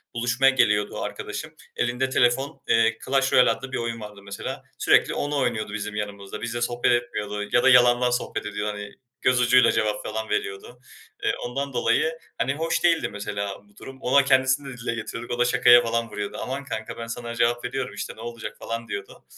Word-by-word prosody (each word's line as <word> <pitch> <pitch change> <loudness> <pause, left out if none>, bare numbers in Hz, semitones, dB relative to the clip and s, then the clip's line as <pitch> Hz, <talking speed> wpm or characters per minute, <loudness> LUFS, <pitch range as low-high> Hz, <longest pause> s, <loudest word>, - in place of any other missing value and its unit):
buluşmaya 125 +3 +3
geliyordu 105 -6 +2
arkadaşım - - -5 0.2
elinde 125 +2 0
telefon, 130 +3 +1
eee, 115 0 +3
"Clash 135 0 +1
Royale" 125 - +6
adlı 135 0 -5
bir - - -2
oyun 115 -1 -3
vardı 105 -1 -9
mesela 100 0 -6
sürekli - - +4
onu 145 0 -2
oynuyordu 115 -6 -1
bizim 105 0 -4
yanımızda, 105 -1 -5
bizimle 120 0 -3
sohbet 120 0 +1
etmiyordu 105 -3 -4
ya 120 - +4
da 135 - +6
yalandan 125 -1 +6
sohbet 125 - -2
ediyor 105 0 -3
hani 105 0 -8 0.3
göz 125 -1 +3
ucuyla 125 +1 +5
cevap 105 -1 0
falan 110 0 -4
veriyordu. 105 +4 -4 0.4
Eee, - - +2
ondan 135 +3 -3
dolayı, 125 +7 +1 0.2
hani, 125 +3 0
hoş 160 +3 -1
değildi 170 -2 +3
mesela 100 -1 -4
bu 100 - -27
durum, 135 0 -11
ona, 140 +2 +4
kendisine 130 +1 +3
de - - -12
dile 115 -1 -3
getiriyorduk 115 +1 -6
o - - -10
da 120 - +4
şakaya 125 -1 +6
falan 115 0 -1
vuruyordu. 105 -1 -5
"Aman 135 +2 -4
kanka 110 -5 -5
ben 115 - -6
sana 120 0 -5
cevap 120 +1 +1
veriyorum 125 -3 -3
işte - - -5
ne 110 - -12
olacak?" 115 -1 -6
falan 115 0 -5
diyordu - - -7
120 Hz, 190 wpm, -25 LUFS, 110-130 Hz, 0.4 s, Royale